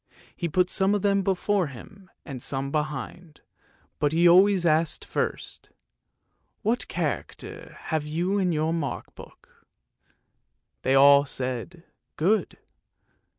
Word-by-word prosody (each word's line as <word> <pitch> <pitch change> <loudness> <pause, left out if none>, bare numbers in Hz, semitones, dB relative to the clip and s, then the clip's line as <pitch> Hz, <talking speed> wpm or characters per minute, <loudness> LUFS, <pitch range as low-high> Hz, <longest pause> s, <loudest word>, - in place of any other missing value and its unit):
He 170 - -3
put 180 +3 +1
some 195 +1 +2
of 205 - -2
them 200 -1 +2
before 195 -1 0
him 185 - -13 0.2
and 135 -5 -7
some 135 +1 -2
behind, 150 +2 -5 0.6
but 145 0 +1
he 170 +2 +4
always 185 +1 +5
asked 160 0 +1
first, - - -4 0.4
" - - -49
What 230 +4 0
character 155 - -5
have 160 -2 -2
you 175 +7 -1
in 185 -2 +1
your 160 0 0
mark 145 -6 -4
book? - - -17 0.5
" - - -51
They 130 +1 +2
all 140 +1 +7
said 130 +6 -5 0.2
" - - -55
good." 200 +7 +1
165 Hz, 135 wpm, -25 LUFS, 145-185 Hz, 0.6 s, all